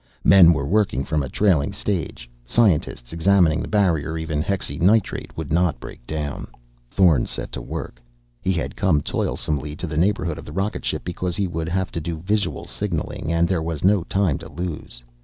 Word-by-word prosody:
Men 90 -4 +8
were 75 -4 0
working 95 - +1
from 75 +1 -1
a 70 - -4
trailing 85 -7 +2
stage 85 -11 -3 0.2
scientists 75 - +1
examining 85 -2 +3
the - - -4
barrier 85 -7 +1
even 80 -2 -2
hexynitrate 100 +3 0
would 80 -2 -4
not 85 0 +2
break - - -11
down. 75 -2 -4 0.4
Thorn 85 -8 +3
set - - -4
to - - -5
work. - - -6 0.4
He 95 - 0
had 85 - -3
come 80 -6 +2
toilsomely 75 0 -2
to 85 - -5
the 75 -3 -4
neighborhood 85 -2 +1
of - - -10
the 75 - -9
rocket 95 +4 -2
ship - - -2
because 90 0 -3
he 100 +1 0
would 80 -2 -3
have 95 +1 -1
to 85 - -4
do 80 +1 -4
visual 95 -1 -1
signaling, 85 -4 -3
and 85 0 +2
there 90 -3 0
was 80 -2 -4
no 100 0 +4
time 95 -7 +1
to - - -10
lose. 80 -8 -6
85 Hz, 185 wpm, -22 LUFS, 75-95 Hz, 0.4 s, Men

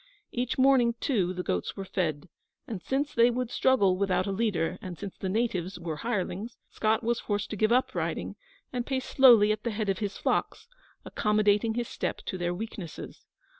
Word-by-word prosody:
Each 245 0 -2
morning, 260 -3 +4
too, 195 -10 +1
the 180 0 -4
goats 90 - -2
were 195 - -4
fed; 165 -4 -2 0.4
and 210 -6 -5
since 275 - -1
they 235 +1 +5
would 245 0 -2
struggle 205 -8 +3
without 190 -1 +1
a 200 - -2
leader, 195 -5 -1
and 185 -5 -7
since 200 - -7
the 190 - -4
natives 195 -4 -1
were 165 -3 -4
hirelings, 215 +1 -3
Scott 220 +1 +1
was 235 +1 0
forced 205 0 -2
to - - -2
give 215 +2 +2
up 250 +2 +2
riding, - - -3 0.4
and 245 -1 -1
pace 260 0 -2
slowly 235 -6 +6
at 215 0 -1
the 235 - -1
head 215 -2 -2
of 190 - 0
his 205 -2 -3
flocks, 445 - -1 0.4
accommodating 210 +1 +2
his 240 -1 -2
step - - -3
to 185 - -4
their 175 0 0
weaknesses. 185 -3 -7
215 Hz, 190 wpm, -28 LUFS, 185-235 Hz, 0.4 s, slowly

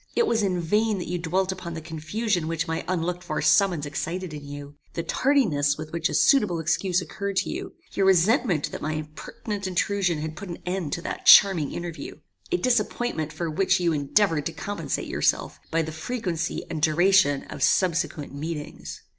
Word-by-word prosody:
It 470 - +3
was 225 - +1
in 185 -3 0
vain 210 +5 +1
that 180 - -5
you 180 0 -2
dwelt 185 +3 0
upon 180 -3 -6
the - - -4
confusion 165 +4 -2
which 165 0 -2
my 160 0 -2
unlooked 180 0 -2
for - - -3
summons 180 -7 +3
excited 165 +4 -4
in 150 -1 -7
you; 145 0 -8 0.2
the 170 - -2
tardiness 165 - +2
with 155 0 -7
which 170 0 0
a - - -3
suitable 210 - +4
excuse 180 +3 +1
occurred 200 +2 -5
to - - 0
you; - - -6 0.2
your 195 -1 +1
resentment 190 - +3
that - - -6
my 155 +1 -2
impertinent 195 +7 -5
intrusion 185 -1 0
had 155 +1 -5
put 195 +3 -8
an 170 - -5
end 180 -4 -2
to 170 - -3
that - - -5
charming 185 -8 +7
interview: 170 -1 -6 0.4
A 360 - +3
disappointment 240 - 0
for 170 - -4
which 185 +4 +2
you 170 -2 +1
endeavoured 150 +2 +1
to 165 - -5
compensate 205 0 -4
yourself, - - 0
by 165 0 +1
the 160 - -5
frequency 170 0 -3
and 160 -2 -4
duration 160 -2 +4
of - - -9
subsequent 165 -5 +1
meetings. 150 +1 -6
175 Hz, 185 wpm, -25 LUFS, 155-195 Hz, 0.4 s, charming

